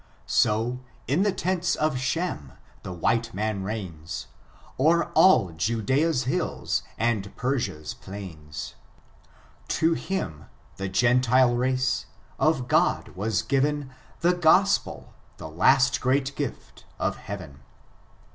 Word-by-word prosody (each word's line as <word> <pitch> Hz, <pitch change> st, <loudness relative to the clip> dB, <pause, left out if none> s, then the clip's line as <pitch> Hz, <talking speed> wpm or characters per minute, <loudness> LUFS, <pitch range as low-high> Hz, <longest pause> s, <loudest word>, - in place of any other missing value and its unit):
60, 115 Hz, +4 st, +1 dB, 0.3 s
in 145 Hz, +8 st, +2 dB
the 205 Hz, 0 st, +3 dB
tents 180 Hz, -1 st, 0 dB
of 155 Hz, -1 st, +1 dB
Shem^ 125 Hz, -, -3 dB, 0.2 s
the -, -, -7 dB
white 115 Hz, +5 st, 0 dB
man 105 Hz, -1 st, -1 dB
reigns 95 Hz, -6 st, -5 dB, 0.5 s
O'er 170 Hz, +4 st, +3 dB
all 130 Hz, -, +5 dB
Judea's 125 Hz, -, +1 dB
hills 125 Hz, -, -1 dB, 0.2 s
and 110 Hz, -4 st, -1 dB
Peniia*s 120 Hz, -, -2 dB
plains. 80 Hz, -7 st, -8 dB, 0.9 s
To 165 Hz, +1 st, +2 dB
Aim 85 Hz, -, -3 dB, 0.3 s
(the 95 Hz, 0 st, -3 dB
Gentile 125 Hz, +4 st, +3 dB
race), 130 Hz, +1 st, 0 dB, 0.3 s
of 145 Hz, -6 st, +2 dB
God, -, -, +2 dB
was 100 Hz, 0 st, -1 dB
given 140 Hz, 0 st, 0 dB, 0.3 s
The 175 Hz, +1 st, +4 dB
Gotpel 180 Hz, +3 st, +2 dB
— -, -, -32 dB
the -, -, -7 dB
last 135 Hz, -, +3 dB
great 135 Hz, +2 st, +1 dB
gift 145 Hz, -5 st, -6 dB
of -, -, -1 dB
Heaven. 90 Hz, -9 st, -8 dB
125 Hz, 115 wpm, -26 LUFS, 100-145 Hz, 0.9 s, all